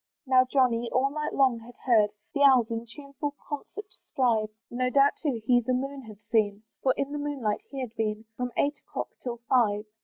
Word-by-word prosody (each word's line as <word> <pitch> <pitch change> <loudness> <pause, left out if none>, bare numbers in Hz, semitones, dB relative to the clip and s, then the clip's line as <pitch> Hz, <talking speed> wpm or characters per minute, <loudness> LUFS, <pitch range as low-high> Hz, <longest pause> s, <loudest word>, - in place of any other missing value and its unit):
Now 255 -1 +5
Johnny 240 -3 +2
all 270 +2 +2
night 300 +1 -3
long 260 -4 +3
had 240 +2 -13
heard 220 -5 +5 0.2
The 285 - -1
owls 255 -5 +6
in 230 +1 -3
tuneful 280 +3 -6
concert 355 +8 -6
strive; 225 -5 0 0.2
No 250 +1 0
doubt 275 +2 +5
too 255 -8 -1
he 245 0 +4
the 255 +2 0
moon 275 +2 -3
had 215 -2 -11
seen; 210 -2 +2 0.2
For 260 - +2
in 275 0 -2
the 295 - -3
moonlight 275 -8 -2
he 275 -1 -5
had 245 -3 -5
been 215 0 -2
From 250 0 -3
eight 290 +1 +1
o'clock - - -5
till 240 -2 -4
five. 215 -5 +2
255 Hz, 195 wpm, -28 LUFS, 230-275 Hz, 0.2 s, owls